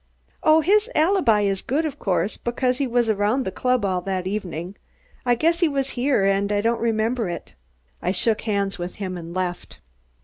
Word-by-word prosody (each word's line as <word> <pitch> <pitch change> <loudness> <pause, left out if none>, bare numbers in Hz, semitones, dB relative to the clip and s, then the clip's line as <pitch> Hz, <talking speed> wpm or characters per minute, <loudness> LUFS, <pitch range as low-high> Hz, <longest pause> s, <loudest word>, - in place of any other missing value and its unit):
"Oh, 315 +1 +5
his 415 +8 +3
alibi 315 - +3
is 195 -1 0
good 300 +6 -1
of 300 - -4
course, 190 +1 0
because 250 +2 -1
he 275 - +1
was 240 -1 +1
around 215 +5 +1
the 190 - -2
club 250 +1 0
all 185 -2 0
that 185 0 -3
evening. 185 -2 -4 0.5
I 245 - +4
guess 330 +7 +2
he 345 - +4
was 275 -2 -1
here 250 -5 +1
and 195 +1 +1
I 205 - +2
don't 230 +2 0
remember 225 -1 0
it." 170 - -7 0.5
I - - -1
shook 215 +3 +2
hands 200 -3 -1
with 175 +1 -5
him 185 -2 -4
and 170 -1 -7
left. 180 -1 -4
215 Hz, 195 wpm, -23 LUFS, 195-255 Hz, 0.5 s, Oh